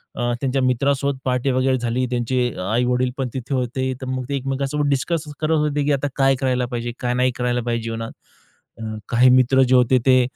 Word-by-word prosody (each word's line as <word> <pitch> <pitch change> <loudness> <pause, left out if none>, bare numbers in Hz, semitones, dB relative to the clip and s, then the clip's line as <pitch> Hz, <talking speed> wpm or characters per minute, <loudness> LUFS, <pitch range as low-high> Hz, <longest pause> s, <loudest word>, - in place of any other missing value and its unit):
अ, 120 0 -1
त्यांच्या 135 0 0
मित्रासोबत 135 +2 +1
पार्टी 125 +1 0
वगैरे 130 0 +1
झाली. 120 +2 -1
त्यांचे 125 +1 0 0.2
आई-वडील 125 +2 +1
पण 135 -2 -1
तिथे 130 +1 -4
होते. 130 +1 -1
तर - - -5
मग 130 0 -2
ते 140 - -1
एकमेकांसोबत 135 +2 -1
डिस्कस 150 +4 0 0.2
करत 155 0 -1
होते, 150 -1 0
की 150 - +1
आता 140 +1 0
काय 135 -1 +3
करायला 125 -1 0
पाहिजे, 120 -1 -4
काय 125 0 -1
नाही 125 +1 +2
करायला 125 0 -1
पाहिजे 115 -1 -2
जीवनात? 115 0 -4 1.0
काही 125 +1 +5
मित्र 130 +1 +4
जे 130 - +5
होते 125 +1 +4
ते 130 -1 +5
130 Hz, 190 wpm, -21 LUFS, 125-135 Hz, 1.0 s, काही